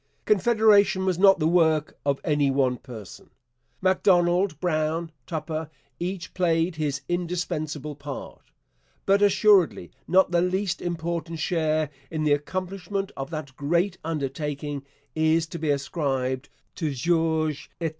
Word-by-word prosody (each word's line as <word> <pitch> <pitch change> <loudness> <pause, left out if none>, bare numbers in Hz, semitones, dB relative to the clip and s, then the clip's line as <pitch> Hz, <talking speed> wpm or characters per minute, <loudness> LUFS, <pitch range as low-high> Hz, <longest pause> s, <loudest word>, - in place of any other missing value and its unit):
Confederation 210 -2 +4
was 185 -2 0
not 195 0 +7
the 155 -2 +1
work 160 -3 +2
of 140 -1 +1
any 145 -3 +2
one 135 -2 +1
person. 115 -6 -11 0.5
Macdonald, 180 -2 +3
Brown, 160 -1 -1 0.2
Tupper 160 -1 -4 0.3
each 180 0 -4
played 165 -1 +1
his 145 -2 -1
indispensable 155 -4 -3
part; 145 -1 -9 0.6
but 200 +1 +4
assuredly 200 - +4 0.2
not 185 +1 +4
the 170 -1 +3
least 185 +1 -1
important 170 -1 -3
share 155 -2 0 0.2
in 155 -1 -2
the 150 -1 +4
accomplishment 185 +5 -3
of 135 0 -5
that 155 -5 -6
great 170 +7 0
undertaking 145 -2 -3 0.3
is 160 +1 +2
to 170 +1 -7
be 155 -1 -1
ascribed 135 -2 -1 0.2
to 155 -5 -3
George 160 0 0
Étienne - - -41
Cartier. 165 -1 0
165 Hz, 130 wpm, -25 LUFS, 150-180 Hz, 0.6 s, not